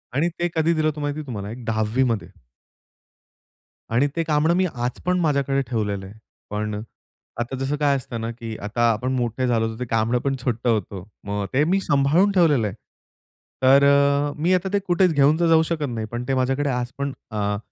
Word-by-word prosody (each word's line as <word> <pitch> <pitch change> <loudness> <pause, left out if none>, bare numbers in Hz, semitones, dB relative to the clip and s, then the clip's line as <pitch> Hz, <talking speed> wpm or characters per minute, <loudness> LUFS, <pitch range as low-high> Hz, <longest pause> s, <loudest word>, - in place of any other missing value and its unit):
आणि 155 +5 +2
ते 175 - +1
कधी 160 +1 +2
दिलं 155 -1 +1
होतं 150 -1 -2
माहिती 145 +1 -2
तुम्हाला 105 -5 -5
एक 120 +2 -8
10वीमध्ये. 110 +1 0 1.6
आणि 135 +5 +3
ते 165 - 0
कांबळं 155 +1 +2
मी 185 - +2
आज 120 +1 -3
पण 180 0 +2
माझ्याकडे 140 -4 +1
ठेवलेलं 105 -5 -2
आहे. 95 - -11 0.4
पण 105 0 -3 0.7
आता 120 +3 -3
जसं 135 +2 -1
काय 145 -1 +2
असतं 120 -3 -5
ना, 115 +1 -3
की 115 -1 -7
आता 115 +3 +1
आपण 125 +4 -2
मोठे 125 +1 -1
झालो 115 -2 +2
होतो, 115 +1 -7
ते 125 - -2
कांबळं 115 +1 +1
पण 135 +2 -1
छोटं 120 -1 -1
होतं. 100 -4 -1 0.2
मग 100 0 -2
ते 135 +3 +3
मी 185 +5 +2
सांभाळून 150 +8 +3
ठेवलेलं 150 - +3
आहे. 95 - -6 0.9
तर 135 +2 +6 0.5
मी 170 +5 +2
आता 185 +1 +1
ते 200 - +3
कुठेच 180 0 +3
घेऊन 145 +2 +4
तर 170 - +3
जाऊ 160 0 +5
शकत 155 -4 -1
नाही. 110 -2 -4
पण 120 +1 -3
ते 135 - 0
माझ्याकडे 135 +3 0
आज 125 -1 -2
पण 140 -1 -2 0.2
अ, 105 -1 -1
130 Hz, 195 wpm, -23 LUFS, 115-150 Hz, 1.6 s, तर